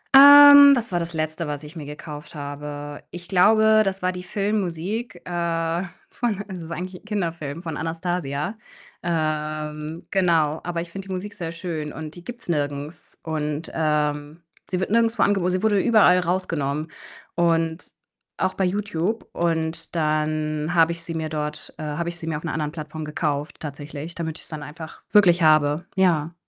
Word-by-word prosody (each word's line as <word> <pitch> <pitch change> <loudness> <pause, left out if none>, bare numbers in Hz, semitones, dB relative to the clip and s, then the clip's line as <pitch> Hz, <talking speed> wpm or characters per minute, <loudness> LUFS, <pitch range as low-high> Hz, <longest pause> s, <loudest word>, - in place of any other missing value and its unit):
Ähm, 285 0 +11
das 235 -5 -3
war 175 - +1
das 170 0 -4
Letzte, 155 +1 -2
was 150 0 -4
ich 150 +3 -11
mir 155 -3 -7
gekauft 150 +1 -9
habe. 145 0 -6
Ich 175 0 -9
glaube, 215 +4 +5
das 195 -2 -3
war 185 - +2
die 180 0 -7
Filmmusik, 200 +1 -3
äh, 170 0 -1 0.3
von 210 -5 -2
es 185 -3 -7
ist 165 - -9
eigentlich 180 +1 -6
'n - - -30
Kinderfilm, 170 -6 -3
von 160 -3 -4
„Anastasia“. 165 0 -3 0.5
Ähm, 155 -1 -3
genau. 165 -5 +2
Aber 170 -1 -2
ich 170 0 -8
finde 195 +1 -7
die 190 - -4
Musik 200 +3 -5
sehr 170 -5 -5
schön 165 -3 -5
und 155 0 -7
die 175 - -11
gibt 245 +4 -8
's - - -11
nirgends 145 +1 -3
und, 155 -1 -3
ähm, 150 0 -1 0.3
sie 185 - -1
wird 190 - -2
nirgendwo 230 0 +3
angebo 195 -3 +2
sie 185 +3 -1
wurde 205 -2 +3
überall 210 -5 +5
rausgenommen 165 -4 -1 0.4
und 165 -1 +1 0.5
auch 185 - 0
bei 190 - 0
Youtube. 200 +2 -2
Und 165 0 -2
dann 155 +1 0
habe 165 0 +5
ich 170 0 -5
sie 165 -1 -5
mir 160 -1 -2
dort, 150 -1 -5
äh - - -6
habe 155 +3 -2
ich 175 - -8
sie 160 - -7
mir 155 -2 -1
auf 155 - -9
'ner 165 - -3
anderen 150 -2 -2
Plattform 155 -1 -7
gekauft, 150 -1 -2
tatsächlich. 150 +2 -7
Damit 160 -2 -4
ich's - - -8
dann 155 -2 -6
einfach 160 +2 -9
wirklich 180 -4 +5
habe, 155 +1 +4
ja. 170 -4 +2
165 Hz, 175 wpm, -23 LUFS, 155-185 Hz, 0.5 s, Ähm